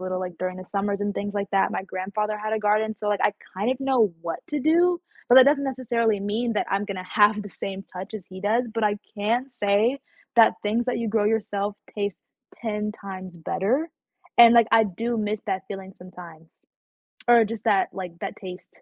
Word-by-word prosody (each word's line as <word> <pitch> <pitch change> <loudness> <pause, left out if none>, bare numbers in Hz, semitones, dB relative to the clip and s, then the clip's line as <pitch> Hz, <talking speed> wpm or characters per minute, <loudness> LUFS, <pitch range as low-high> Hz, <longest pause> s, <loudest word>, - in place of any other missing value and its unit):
little, 185 0 -3
like, 180 -2 -6
during 185 0 -3
the 185 - -8
summers 200 0 -2
and 205 0 -1
things 205 0 -4
like 200 -1 -2
that, 195 -1 +3
my - - -2
grandfather 210 +3 -3
had 215 +1 -3
a 220 - +1
garden, 215 +1 +1
so, 210 - -3
like, 205 -2 0
I 205 - +3 0.2
kind 210 +6 0
of 260 - -2
know 255 -8 +2
what 170 -1 -4
to 295 -2 -2
do, 345 +4 +3 0.3
but 245 - +6
that 260 - +10
doesn't 280 0 +3
necessarily 235 -5 0
mean 220 +4 -1
that - - 0
I'm 200 +1 +1
gonna 195 -3 -5
have 210 +2 +3
the 205 - -9
same 195 +2 -6
touch 185 +3 -9
as 205 -5 -7
he 185 0 -10
does, 230 +4 +1
but 225 -1 0
I 205 0 +1 0.2
can 235 +6 0
say 225 +3 +1 0.4
that 225 -1 +7
things 225 +4 0
that 250 - 0
you 230 - -2
grow 210 0 +1
yourself 205 -2 -1 0.2
taste 200 -2 -2 0.4
10 210 -2 -3
times 190 -4 -8
better 240 - -1 0.5
and, 235 -1 +10
like, 235 -2 +6
I 225 0 +7
do 230 +5 -2
miss 215 -1 -1
that 190 -1 -1
feeling 195 -1 -8
sometimes 170 -3 -12 0.8
or 235 -1 +7
just 225 0 -6
that, 195 -2 +3
like, 180 -3 -7
that - - -5
taste. 185 -2 -9
210 Hz, 210 wpm, -25 LUFS, 195-230 Hz, 0.8 s, that